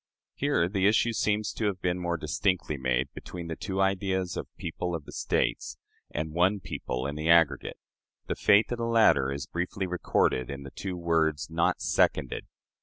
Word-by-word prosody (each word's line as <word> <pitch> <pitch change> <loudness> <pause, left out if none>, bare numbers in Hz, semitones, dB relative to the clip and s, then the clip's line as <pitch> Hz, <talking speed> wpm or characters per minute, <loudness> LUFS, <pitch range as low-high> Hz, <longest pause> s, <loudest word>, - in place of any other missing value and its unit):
" - - -66
Here 140 -12 +1
the 95 0 +2
issue 115 +2 +3
seems 105 -1 0
to 110 - -1
have 95 -3 -2
been 90 0 -1
more 85 -1 -1
distinctly 85 +1 0
made 65 0 -1
between 85 -2 -8
the 80 - -3
two 95 +2 -4
ideas 95 -2 0
of - - -4
people 85 +1 -3
of 75 -4 -6
the - - -10
States - - -1 0.3
and 80 +1 -3
one 90 +4 +3
people 65 -7 -4
in 70 - -2
the 75 +2 -2
aggregate. 85 -3 +4 0.5
The - - -2
fate 105 +4 +4
of 120 - -2
the 115 - -1
latter 110 -13 +4
is 70 +1 -4
briefly 90 +2 -3
recorded 85 -7 0
in 70 0 -6
the 70 - -9
two 95 -2 -5
words, 80 -4 0
"not 85 +1 +1
seconded." - - +1
85 Hz, 185 wpm, -28 LUFS, 75-95 Hz, 0.5 s, aggregate